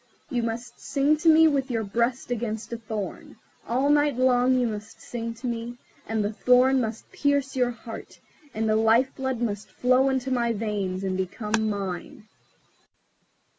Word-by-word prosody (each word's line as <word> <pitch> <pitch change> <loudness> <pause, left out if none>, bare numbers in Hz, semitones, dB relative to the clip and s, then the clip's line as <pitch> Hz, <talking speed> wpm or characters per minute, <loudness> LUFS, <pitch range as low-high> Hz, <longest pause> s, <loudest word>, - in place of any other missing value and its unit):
You 245 -2 0
must 230 +1 -5
sing 285 +2 +2
to 325 +2 +3
me 320 0 +7
with 275 -3 0
your 230 -3 -1
breast 235 +5 -1
against 225 -1 -3
a - - -2
thorn. 215 -3 -6 0.3
All 255 +4 +1
night 290 -2 +3
long 255 0 +4
you 250 - +2
must 210 -2 -5
sing 230 -1 -5
to 230 - -10
me, 235 0 -4 0.3
and 220 -2 0
the 210 - -2
thorn 255 +3 +4
must 225 -1 -5
pierce 280 -2 0
your 250 -2 +2
heart, 230 -1 -9 0.3
and 220 +1 -2
your 215 0 +3
life 225 +4 +3
blood 265 -2 -2
must 210 -2 -3
flow 255 +2 +3
into 265 0 -1
my 235 -2 +1
veins, 200 -4 -2
and 190 -1 -1
become 215 +4 -1
mine." 200 +1 -5
235 Hz, 170 wpm, -26 LUFS, 220-260 Hz, 0.3 s, me